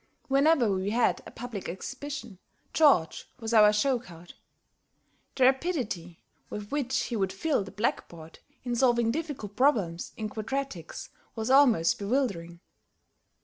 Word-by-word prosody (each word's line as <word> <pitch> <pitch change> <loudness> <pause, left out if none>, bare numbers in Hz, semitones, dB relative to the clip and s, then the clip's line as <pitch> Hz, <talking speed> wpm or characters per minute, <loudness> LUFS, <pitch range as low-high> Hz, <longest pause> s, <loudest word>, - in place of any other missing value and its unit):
Whenever 275 -4 +4
we 190 +1 -1
had 235 +3 +1
a - - -8
public 230 -5 -6
exhibition, 255 - -7 0.3
George 275 - +3
was 225 -1 -4
our 210 -2 +7
show 245 +4 +1
card. 175 -6 -13 1.0
The 260 - +2
rapidity 255 - 0 0.3
with 205 0 -7
which 275 -3 -1
he 240 - -4
would 195 -3 0
fill 245 +4 0
the 195 - -10
blackboard, 170 -6 -4 0.2
in 245 -1 -2
solving 240 -2 +3
difficult 275 - -5
problems 205 - +1
in 215 - -3
quadratics, 215 - -5 0.3
was 225 +2 -2
almost 250 - +4
bewildering. 200 -7 -2
230 Hz, 130 wpm, -28 LUFS, 195-270 Hz, 1.0 s, our